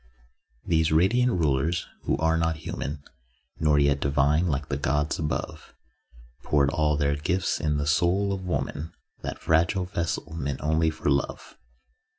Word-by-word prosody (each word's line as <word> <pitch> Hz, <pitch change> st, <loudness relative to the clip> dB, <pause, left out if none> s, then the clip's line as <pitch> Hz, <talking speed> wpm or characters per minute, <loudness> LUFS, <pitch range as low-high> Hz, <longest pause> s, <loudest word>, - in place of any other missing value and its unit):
These 80 Hz, -1 st, +2 dB
Radiant 115 Hz, +10 st, +3 dB
Rulers 80 Hz, -, +1 dB, 0.2 s
(who -, -, +1 dB
are 80 Hz, +2 st, +2 dB
not 80 Hz, 0 st, +1 dB
human 75 Hz, -1 st, -5 dB, 0.6 s
Nor 75 Hz, -2 st, +3 dB
yet 70 Hz, -1 st, +3 dB
divine 70 Hz, +4 st, +2 dB
like 70 Hz, -2 st, -1 dB
the 70 Hz, -, -2 dB
gods 75 Hz, +2 st, 0 dB
above) 75 Hz, -1 st, -4 dB, 0.7 s
Poured 70 Hz, -2 st, +2 dB
all 75 Hz, -3 st, +1 dB
their 70 Hz, -1 st, +1 dB
gifts 90 Hz, +6 st, -1 dB
in 75 Hz, -2 st, 0 dB
the 70 Hz, -, -1 dB
soul 90 Hz, +6 st, +2 dB
of 95 Hz, -, -4 dB
woman, 85 Hz, -2 st, -3 dB, 0.3 s
That -, -, -5 dB
fragile 85 Hz, +4 st, +1 dB
vessel 85 Hz, -2 st, -3 dB
meant 70 Hz, -4 st, -3 dB
only 80 Hz, +2 st, +2 dB
for 80 Hz, -, -5 dB
love. 70 Hz, 0 st, -2 dB
80 Hz, 150 wpm, -26 LUFS, 70-85 Hz, 0.7 s, Radiant